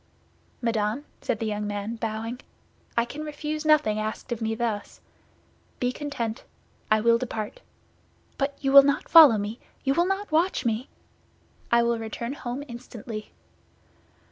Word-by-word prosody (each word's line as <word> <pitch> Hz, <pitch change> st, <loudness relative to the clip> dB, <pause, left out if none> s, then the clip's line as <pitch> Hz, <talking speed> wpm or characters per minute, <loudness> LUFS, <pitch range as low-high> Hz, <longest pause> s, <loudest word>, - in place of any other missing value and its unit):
"Madame," 230 Hz, +4 st, 0 dB, 0.2 s
said 225 Hz, -, -1 dB
the 225 Hz, -, -3 dB
young 210 Hz, -1 st, -2 dB
man, 205 Hz, +2 st, -3 dB
bowing; 225 Hz, +2 st, -4 dB, 0.6 s
"I 235 Hz, -, +4 dB
can 290 Hz, +5 st, -7 dB
refuse 305 Hz, +1 st, -4 dB
nothing 300 Hz, -9 st, +4 dB
asked 215 Hz, +4 st, -4 dB
of 235 Hz, -1 st, -2 dB
me 225 Hz, 0 st, -1 dB
thus. 220 Hz, -3 st, -3 dB, 0.8 s
Be 250 Hz, 0 st, +1 dB
content; 255 Hz, -6 st, -4 dB, 0.5 s
I 215 Hz, -, +4 dB
will 230 Hz, +1 st, +4 dB
depart." 230 Hz, -, -4 dB, 0.8 s
"But 275 Hz, 0 st, -2 dB
you 270 Hz, -2 st, 0 dB
will 280 Hz, 0 st, +11 dB
not 280 Hz, +2 st, 0 dB
follow 310 Hz, -9 st, +9 dB
me; 210 Hz, +3 st, -4 dB, 0.2 s
you 270 Hz, -, +2 dB
will 345 Hz, +4 st, +2 dB
not 390 Hz, -1 st, -2 dB
watch 325 Hz, -3 st, +2 dB
me?" 230 Hz, +3 st, -1 dB, 0.8 s
"I 235 Hz, 0 st, +5 dB
will 235 Hz, -1 st, +1 dB
return 230 Hz, +3 st, -4 dB
home 255 Hz, 0 st, -5 dB
instantly." 235 Hz, -2 st, -8 dB
235 Hz, 145 wpm, -26 LUFS, 220-280 Hz, 0.8 s, will